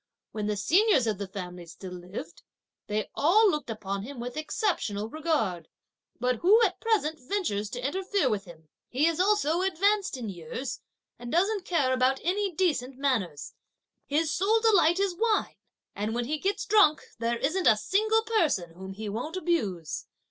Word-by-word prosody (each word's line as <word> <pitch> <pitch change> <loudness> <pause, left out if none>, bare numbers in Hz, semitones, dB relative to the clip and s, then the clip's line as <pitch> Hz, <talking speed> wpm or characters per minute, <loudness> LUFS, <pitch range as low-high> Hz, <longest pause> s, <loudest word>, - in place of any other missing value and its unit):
When 210 -1 -3
the 210 -1 -1
seniors 330 - +3
of 215 -3 -1
the 200 - -4
family 180 -2 -7
still 180 +3 -9
lived, 175 -2 -8 0.5
they 210 0 -2
all 395 +8 +4
looked 300 -6 -3
upon 200 -3 -4
him 255 +4 -8
with 245 +1 -5
exceptional 310 - -1
regard; 225 - -1 0.5
but 250 0 +1
who 400 - +5
at - - +1
present 380 -9 +1
ventures 250 - -2
to 245 +2 -5
interfere 380 +1 0
with 210 -4 -1
him? 160 -3 -15 0.2
He 270 +5 +1
is 335 0 +1
also 370 -4 +2
advanced 385 -2 +1
in 240 -3 -5
years, 195 - -5 0.4
and 240 0 -7
doesn't 390 +3 +1
care 290 -9 +1
about 260 +1 +2
any 390 +3 0
decent 295 -8 0
manners; 225 - -1 0.5
his 305 +2 +1
sole 425 +5 +3
delight 385 -6 +4
is 395 -3 0
wine; 440 +2 0 0.4
and 210 +3 -2
when 240 0 -1
he 305 +4 -2
gets 395 +4 -1
drunk, 360 -8 +4 0.2
there 235 +1 0
isn't 315 +9 0
a 215 - +6
single 435 - +2
person 330 - +1
whom 190 +2 -8
he 215 +2 -6
won't 250 - -4
abuse. 205 - -2
275 Hz, 170 wpm, -28 LUFS, -, 0.5 s, a